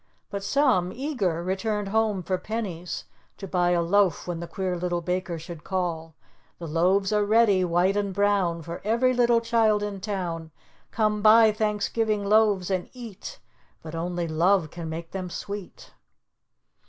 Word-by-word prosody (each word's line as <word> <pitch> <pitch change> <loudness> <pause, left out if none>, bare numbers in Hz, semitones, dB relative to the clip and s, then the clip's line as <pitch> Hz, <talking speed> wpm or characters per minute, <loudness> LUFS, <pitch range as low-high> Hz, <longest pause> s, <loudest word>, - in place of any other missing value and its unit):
But 200 -1 -4
some, 235 -9 +2
eager, 205 - -2
returned 200 +2 -2
home 215 -3 +1
for 185 +1 -1
pennies 185 -6 -5 0.3
to 195 - -7
buy 175 -1 +1
a 175 -1 +2
loaf 195 +1 +2
when 175 -2 -4
the 170 - -6
Queer 185 0 -3
Little 175 0 -2
Baker 180 0 -2
should 165 -1 -9
call. 165 -4 -3 0.4
"The 170 - -7
loaves 185 +6 +1
are 210 0 +3
ready, 205 -3 +4
white 180 +3 +2
and 205 -1 -1
brown, 190 -4 +1
For 170 +2 -7
every 235 +5 +2
little 240 -1 +3
child 225 -3 +2
in 205 -1 -4
town, 175 -5 -4 0.4
Come 215 -1 0
buy 220 +1 +7
Thanksgiving 210 0 -1
loaves 205 -3 +3
and 185 -1 -2
eat, 240 - -9 0.5
But 155 - -8
only 175 +1 -2
Love 165 +1 +2
can 170 -2 -6
make 165 +1 -6
them 185 -2 -4
sweet." 200 +2 -8
195 Hz, 155 wpm, -26 LUFS, 175-215 Hz, 0.5 s, buy